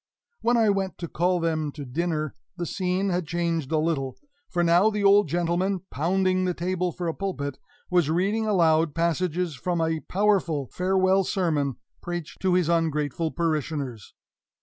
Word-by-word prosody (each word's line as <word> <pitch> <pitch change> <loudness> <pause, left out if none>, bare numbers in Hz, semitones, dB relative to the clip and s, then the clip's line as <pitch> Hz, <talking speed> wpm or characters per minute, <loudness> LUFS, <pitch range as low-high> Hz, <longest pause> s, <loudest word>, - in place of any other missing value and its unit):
When 240 +1 +3
I 220 -3 +4
went 195 -2 -2
to 170 - -5
call 180 +3 +1
them 160 -3 -1
to 145 -3 -7
dinner, 155 +2 -2 0.2
the 175 - -2
scene 185 +2 -1
had 175 -2 -1
changed 165 -4 -1
a 160 - +2
little, 155 -5 -1 0.3
for 175 -1 0
now 175 +5 +5
the 210 -1 -2
old 200 +1 +6
gentleman, 175 +2 0
pounding 185 +4 +1
the 180 -1 -1
table 180 0 -1
for 175 +1 -4
a 165 - -1
pulpit, 145 -9 -4 0.3
was 175 -4 +3
reading 200 +7 +1
aloud 165 -6 +3
passages 170 0 0
from 175 +5 -2
a 160 0 0
powerful 180 -8 +1
farewell 190 +1 +2
sermon 155 -9 0 0.3
preached 175 -3 -5
to 185 -1 +2
his 180 -3 +2
ungrateful 160 -2 0
parishioners. 150 - -3
170 Hz, 160 wpm, -26 LUFS, 160-185 Hz, 0.3 s, old